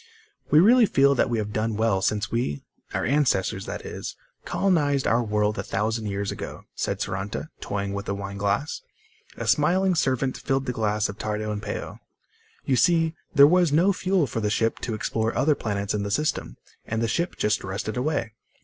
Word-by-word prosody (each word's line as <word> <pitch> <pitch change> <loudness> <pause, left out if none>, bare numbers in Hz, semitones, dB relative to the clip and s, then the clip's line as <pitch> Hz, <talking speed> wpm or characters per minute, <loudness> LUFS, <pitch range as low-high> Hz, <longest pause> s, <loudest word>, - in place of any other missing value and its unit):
"We 150 - +5
really 230 +5 +6
feel 140 -3 +4
that 130 - +1
we 120 - 0
have 105 -1 -3
done 110 0 -1
well 110 -4 +2
since 105 +2 0
we... 115 - -1 0.3
our - - -1
ancestors, 120 -9 +1
that - - -6
is... - - -6 0.3
colonized 145 -8 +1
our 115 +2 +3
world 105 -1 0
a - - -2
thousand 110 +2 -1
years 100 0 -2
ago," - - -7
said - - -2
Saranta, 100 +10 -4
toying 100 -1 -3
with 100 0 -4
a 100 - 0
wineglass. 100 +7 -2 0.6
A - - -4
smiling 180 +5 +3
servant 130 -5 0
filled 135 0 -1
the 125 - -1
glasses 105 -2 0
of 105 - -8
Tardo 110 0 -2
and 105 -1 -3
Peo. - - -5 0.7
"You 130 - +2
see, 165 +4 +3 0.2
there 140 -1 +9
was 175 +1 +4
no 175 +7 +4
fuel 185 -3 +1
for 115 -2 -3
the 105 -1 0
ship 115 +2 0
to 115 - -3
explore 110 +1 -1
other 150 +2 +4
planets 100 -5 -2
in 105 - -1
the 100 - -3
system, 110 - -1 0.3
and 115 +1 -2
the - - +1
ship 170 +10 -1
just 105 0 0
rusted 100 +3 -4
away. 125 -4 -1
115 Hz, 190 wpm, -25 LUFS, 105-145 Hz, 0.7 s, there